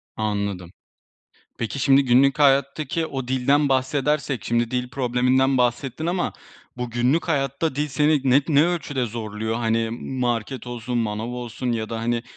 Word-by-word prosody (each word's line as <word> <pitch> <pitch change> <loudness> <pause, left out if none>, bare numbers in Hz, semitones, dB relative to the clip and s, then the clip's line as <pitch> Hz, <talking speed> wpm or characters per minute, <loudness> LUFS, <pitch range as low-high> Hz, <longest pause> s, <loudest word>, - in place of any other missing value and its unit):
Anladım. 100 -4 -3 0.9
Peki, 115 +4 -3
şimdi 135 +1 +5
günlük 135 +4 +4
hayattaki 140 +3 +2
o 135 -4 -5
dilden 140 +3 +2
bahsedersek, 135 -2 0
şimdi 120 0 0
dil 125 0 -2
probleminden 130 +1 +2
bahsettin 125 +5 -1
ama 175 +1 -1 0.4
bu 125 -1 -3
günlük 125 +9 +1
hayatta 140 0 -1
dil 150 +1 0
seni 150 +1 +2
ne, 135 +3 +5
ne 150 +1 +4
ölçüde 145 -7 -1
zorluyor? 110 0 -4
Hani, 115 -1 0 0.3
market 120 +1 -2
olsun, 120 0 -4
manav 110 0 -2
olsun 125 0 -4
ya 110 -2 -2
da, 115 -1 -4
hani, 120 +1 -1
125 Hz, 145 wpm, -23 LUFS, 115-140 Hz, 0.9 s, şimdi